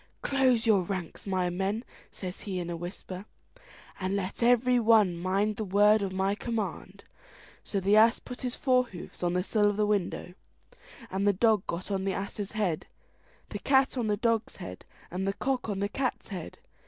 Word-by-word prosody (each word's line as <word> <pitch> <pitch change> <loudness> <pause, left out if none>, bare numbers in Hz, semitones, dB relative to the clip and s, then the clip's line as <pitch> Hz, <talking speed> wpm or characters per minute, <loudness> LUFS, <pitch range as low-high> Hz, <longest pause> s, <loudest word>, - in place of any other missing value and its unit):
"Close 255 -4 +3
your 215 -4 +5
ranks, 180 0 -5
my 185 -2 +1
men," 195 +5 -1 0.3
says 185 -1 -6
he 195 -3 -4
in 175 -1 -3
a - - -2
whisper, 180 +2 -7 0.7
"and 190 0 -1
let 195 +2 -3
every 245 +1 +4
one 215 -6 +5
mind 195 +4 0
the 220 - -2
word 205 +2 +4
of 195 - -1 0.3
command." 230 -4 -4 0.6
So 200 - -2
the 195 +2 +3
ass 225 +2 +6
put 250 -1 -9
his 250 -1 -2
fore 255 -2 +3
hoofs 185 -7 -10
on 175 -1 +1
the 180 0 +1
sill 210 +1 +2
of 205 - -2
the 210 - +3
window, 200 -3 -1 0.8
the 200 +1 +3
dog 215 0 +2
got 180 +4 -4
on 190 -1 0
the 195 0 0
ass's 200 +1 -4
head, 195 -7 -1 0.6
the - - -5
cat 270 -1 +3
on 240 -4 -1
the 210 -1 +1
dog's 230 0 0
head, 90 0 -9 0.3
and 190 +2 -2
the 195 - +1
cock 255 +1 -2
on 195 -1 -2
the 200 - +1
cat's 255 +3 -2
head. 185 -5 -6
205 Hz, 185 wpm, -29 LUFS, 185-230 Hz, 0.8 s, ass